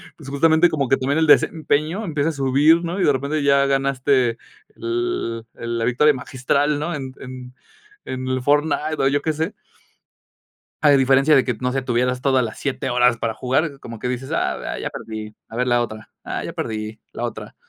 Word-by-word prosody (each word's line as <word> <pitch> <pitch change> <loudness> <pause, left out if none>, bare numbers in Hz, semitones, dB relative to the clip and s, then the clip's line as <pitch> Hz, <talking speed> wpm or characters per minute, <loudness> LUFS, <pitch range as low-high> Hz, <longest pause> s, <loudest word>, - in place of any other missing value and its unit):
Pues, 135 - -11
justamente 160 +4 +4
como 145 -5 -1
que 135 - +4
también 140 +4 0
el 160 - +2
desempeño 160 +6 +2
empieza 155 -1 0
a - - -1
subir, 145 +4 +3
¿no? 175 +3 -3
Y - - +3
de 145 - +5
repente 140 +3 -1
ya 140 0 +4
ganaste 135 -3 +1 0.4
el 350 - -2
el 115 0 -4
la 115 - -1
victoria 135 +5 +4
magistral, 140 +2 0
¿no? 170 +3 -2
En 135 -2 -5
en 125 -1 -9 0.5
en 130 0 -5
el 130 -1 -1
Fortnite 150 +2 +1
o 135 - +3
yo 145 +1 +1
que 155 +1 -1
sé. 160 +6 -2 1.3
A 150 - +6
diferencia 135 +2 +5
de 135 - +5
que, 125 - 0
no 125 - 0
sé, 135 0 -2
tuvieras 125 0 0
todas 130 -2 +3
las 110 -2 -5
7, 135 -1 -2
horas 125 -1 +3
para 115 -1 -2
jugar, 135 +3 -1
como 115 -2 -9
que - - -3
dices: 125 +1 -4
"Ah, - - -2
ya - - -3
perdí. 110 -1 -7
A 115 - -11
ver 125 +1 0
la 120 0 +3
otra. 110 -1 -8
Ah, - - -4
ya - - -6
perdí, 110 0 -4
la - - -5
otra". - - -6
135 Hz, 200 wpm, -21 LUFS, 125-150 Hz, 1.3 s, A